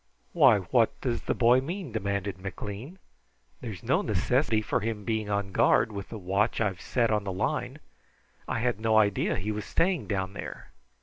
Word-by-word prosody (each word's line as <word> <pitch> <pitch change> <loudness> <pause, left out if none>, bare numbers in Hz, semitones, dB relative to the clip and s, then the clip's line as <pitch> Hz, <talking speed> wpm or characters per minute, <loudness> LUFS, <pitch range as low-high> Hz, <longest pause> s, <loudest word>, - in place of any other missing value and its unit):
"Why, 135 -10 +6
what 110 +5 +1
does 120 -3 -1
the - - -1
boy 125 +1 +5
mean?" 170 +1 -5
demanded 100 -3 -2
McLean. 105 - -7 0.6
"There's 105 -8 -7
no - - +2
necessity 110 -1 +1
for 110 +3 -1
him 110 -1 -3
being 110 -2 -1
on 100 -1 -1
guard, 110 - +3
with 100 -2 -6
the 110 - -6
watch 100 +3 0
I've 100 -5 -1
set 120 -3 +1
on 105 -1 +1
the 100 - -3
line. 95 - -2 0.7
I - - -1
had 120 -3 0
no 110 0 +2
idea 100 -2 +2
he 105 +4 -2
was 105 0 -3
staying 175 -2 0
down 95 -2 -2
there." - - -8
110 Hz, 180 wpm, -28 LUFS, 100-120 Hz, 0.7 s, Why